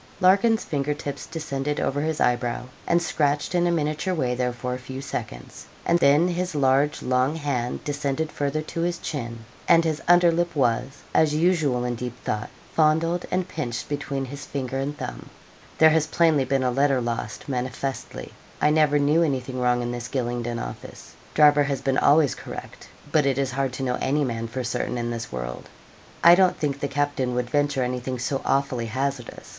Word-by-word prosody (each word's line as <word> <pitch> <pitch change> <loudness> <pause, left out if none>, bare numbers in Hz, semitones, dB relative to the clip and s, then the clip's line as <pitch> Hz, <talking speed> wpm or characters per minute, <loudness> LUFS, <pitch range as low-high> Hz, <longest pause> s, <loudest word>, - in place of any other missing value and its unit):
Larkin's 200 +5 +4
finger 145 -1 -1
tips 145 -1 -6
descended 150 -2 -3
over 145 +1 0
his 155 0 -1
eyebrow, 120 0 0 0.2
and 170 - +4
scratched 145 -3 0
in 175 0 +2
a - - +2
miniature 155 +3 -1
way 125 -6 0
there 125 0 0
for 125 +1 -4
a 125 - -4
few 130 +1 -7
seconds, - - -7 0.2
and 170 - +3
then 145 +3 +5
his 180 -1 -2
large 140 +1 +2
long 130 +4 +1
hand 140 -6 -2
descended 145 +1 -2
further 145 +2 -2
to 165 - -4
his 175 0 0
chin, 115 -8 -5 0.2
and 165 - +6
his 155 -2 -1
under 175 0 +6
lip 170 +1 -1
was, 130 +1 0
as 155 -1 +3
usual 155 -7 +2
in 125 - -1
deep 120 +1 -5
thought, 105 0 -2 0.2
fondled 165 +2 +2
and 185 0 -1
pinched 125 -10 -4
between 145 -2 -3
his 135 +1 -8
finger 135 -1 -4
and 145 +2 -3
thumb. - - -7 0.5
'There 160 0 +7
has 155 -1 +2
plainly 160 -4 +3
been 135 0 +1
a 125 - +1
letter 135 +1 +2
lost, 120 -1 -4
manifestly. 130 0 -4 0.3
I 150 - +3
never 150 -1 +4
knew 145 +3 +3
anything 130 -5 -1
wrong 125 -1 +2
in 120 - -2
this 120 0 -5
Gylingden 120 -2 -2
office. - - -8 0.2
Driver 150 -1 +6
has 140 -2 -1
been 135 -1 +1
always 145 -1 +4
correct; - - -9 0.2
but 150 -3 +3
it 135 -1 +1
is 135 -2 0
hard 135 0 -1
to 135 - -4
know 125 -1 -1
any 145 +3 +1
man 115 -3 -2
for 125 +3 -4
certain 125 0 -2
in 120 0 -2
this 115 -1 -5
world. - - -6 0.5
I 170 - +9
don't 185 0 +4
think 140 -2 -2
the 140 - -1
captain 140 -3 -1
would 125 0 -2
venture 145 -2 +1
anything 125 +1 -3
so 130 +3 -2
awfully 135 -4 0
hazardous. 130 +1 -4
140 Hz, 190 wpm, -24 LUFS, 125-155 Hz, 0.5 s, I